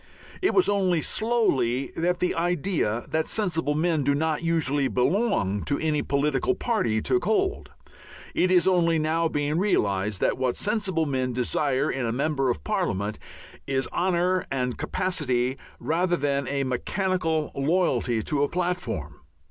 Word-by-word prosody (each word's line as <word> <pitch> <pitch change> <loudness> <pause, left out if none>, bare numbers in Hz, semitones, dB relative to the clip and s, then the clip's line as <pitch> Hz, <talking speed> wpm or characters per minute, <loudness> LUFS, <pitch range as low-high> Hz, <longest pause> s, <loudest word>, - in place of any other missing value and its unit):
It 385 - +1
was 370 - +5
only 185 -5 +2
slowly 140 - +1
that 175 +2 0
the 180 - 0
idea 165 - -1
that 160 0 0
sensible 165 -8 0
men 160 -1 +1
do 140 +1 +2
not 155 +1 0
usually 150 -5 +1
belong 125 - +1
to 140 - +1
any 155 -2 0
political 150 - 0
"party" 150 - 0
took 370 - +1
hold. 390 -2 0 0.6
It 185 - +2
is 180 0 +4
only 170 -3 +3
now 160 +2 +1
being 150 +1 -1
realized 100 - 0
that - - +1
what 130 -2 0
sensible 200 -6 0
men 130 -3 -1
desire 135 +3 0
in 125 -3 -2
a - - 0
member 135 +1 0
of 120 - -2
parliament 110 - -1 0.5
is 135 -1 0
honour 180 0 +1
and 125 -2 -1
capacity 130 -9 -1 0.2
rather 175 +2 +1
than 140 -1 -1
a 140 -1 -1
mechanical 160 +4 -1
loyalty 135 -7 +1
to 145 +4 -1
a 145 - +2
"platform." 175 - -3
155 Hz, 150 wpm, -25 LUFS, 130-180 Hz, 0.6 s, was